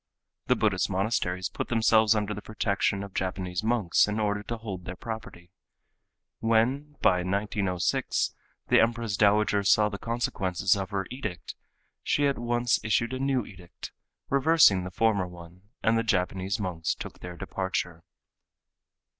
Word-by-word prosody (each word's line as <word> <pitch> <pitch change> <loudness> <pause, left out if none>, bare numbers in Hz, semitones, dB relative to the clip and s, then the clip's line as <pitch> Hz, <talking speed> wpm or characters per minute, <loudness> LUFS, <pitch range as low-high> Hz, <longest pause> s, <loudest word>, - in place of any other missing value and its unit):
The - - +4
Buddhist 100 -4 +1
monasteries 95 -2 -1
put - - -5
themselves 110 -1 +4
under 105 -1 -1
the 105 - -7
protection 100 -2 -1
of 100 -2 -9
Japanese 90 0 -3
monks 110 -7 +2
in 105 +1 -2
order 105 -1 0
to 115 +3 -5
hold 95 -6 -7
their 90 - -6
property. 90 -6 -8 0.9
When 120 +7 +1
by 90 -3 +4
1906 100 -1 -1 0.4
the - - +6
Empress 115 -2 0
Dowager 105 0 +3
saw 105 +1 +4
the 100 -1 -6
consequences 95 -6 0
of 95 -1 -4
her 100 -2 -2
edict, 110 -9 -5 0.5
she 145 - +1
at 140 -3 0
once 120 0 +1
issued 115 +3 +1
a 130 - -3
new 135 -4 0
edict, 90 -3 -11 0.4
reversing 140 - +4
the - - -4
former 100 -1 +1
one, 90 +3 -14
and 115 0 +3
the - - 0
Japanese 95 0 -1
monks 90 -5 -2
took - - -9
their 90 -1 -8
departure. 95 -3 -3
105 Hz, 145 wpm, -27 LUFS, 95-115 Hz, 0.9 s, the